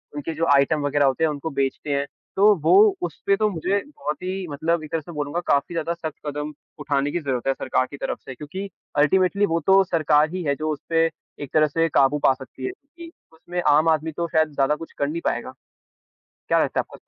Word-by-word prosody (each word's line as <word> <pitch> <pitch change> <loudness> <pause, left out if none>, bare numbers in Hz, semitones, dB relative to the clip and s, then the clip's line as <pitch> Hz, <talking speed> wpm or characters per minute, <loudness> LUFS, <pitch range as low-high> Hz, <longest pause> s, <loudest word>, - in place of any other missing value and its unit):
उनके 145 +3 -4
जो 165 +2 0
आइटम 140 +2 +3
वग़ैरह 145 0 +2
होते 135 +4 +1
हैं, 160 - +4
उनको 150 +2 -4
बेचते 140 0 -2
हैं। 140 0 0 0.3
तो 205 +2 +6
वो 165 +3 +4 0.3
उसपे 175 +4 0
तो 215 -1 +2
मुझे 195 +2 -1
बहुत 150 - -5
ही 185 0 -3
मतलब 160 +3 -1
एक 155 - -10
तरह 165 -1 -1
से 170 - -11
बोलूँगा 150 +2 -3
काफ़ी 140 +5 +1
ज़्यादा 165 0 -1
सख्त 160 -3 -6
कदम 150 +1 -4 0.3
उठाने 145 -1 0
की 175 - -1
ज़रूरत 135 -6 -3
है 135 - +3
सरकार 130 0 0
की 140 - -8
तरफ - - -3
से 130 - -8
क्योंकि 185 +9 -6 0.3
अल्टीमेटली 185 +7 +3
वो 165 -2 0
तो 195 0 +6
सरकार 155 -3 +2
ही 185 -1 -3
है, 140 -2 0
जो 155 +2 -3
उसपे 165 +2 0 0.4
एक 140 - -10
तरह 155 -1 +4
से 165 +3 0
काबू 140 0 +3
पा 135 - +6
सकती 130 0 -9
है, - - -2
क्योंकि 330 +4 -14 0.2
उसमें 175 +2 -5
आम 155 +3 +5
आदमी 160 0 +1
तो 170 +2 -3
शायद 155 -2 +1
ज़्यादा 140 +1 +2
कुछ 165 +2 -10
कर 140 - 0
नहीं 165 +3 -3
पाएगा, 120 +2 -2 0.9
क्या - - +3
लगता - - -1
है - - 0
आप - - -11
155 Hz, 225 wpm, -23 LUFS, 145-170 Hz, 0.9 s, तो